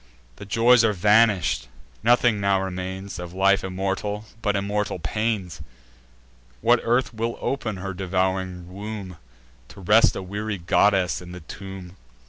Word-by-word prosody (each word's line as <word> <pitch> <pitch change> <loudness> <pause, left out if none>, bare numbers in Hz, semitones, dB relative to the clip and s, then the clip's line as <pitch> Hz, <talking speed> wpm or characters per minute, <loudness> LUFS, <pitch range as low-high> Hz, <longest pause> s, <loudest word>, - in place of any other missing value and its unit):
The 100 - -9
joys 115 +3 +5
are 110 -2 +3
vanish'd: 100 - +3 0.3
nothing 120 -1 +3
now 100 -1 +2
remains, 95 +1 -5
Of 90 0 -7
life 100 +1 +3
immortal, 95 +3 -3 0.2
but 105 -3 0
immortal 100 +1 -1
pains. 95 -1 -2 1.0
What 120 - +4
earth 120 +2 +1
will 115 +1 -3
open 115 -7 -2
her 95 +1 -5
devouring 95 -1 -2
womb, 100 -3 -7 0.5
To - - -13
rest 105 +5 +5
a 95 - -4
weary 105 +2 -4
goddess 90 -3 +2
in 90 0 -10
the 90 - -9
tomb!" 95 +1 -9
100 Hz, 135 wpm, -24 LUFS, 95-105 Hz, 1.0 s, joys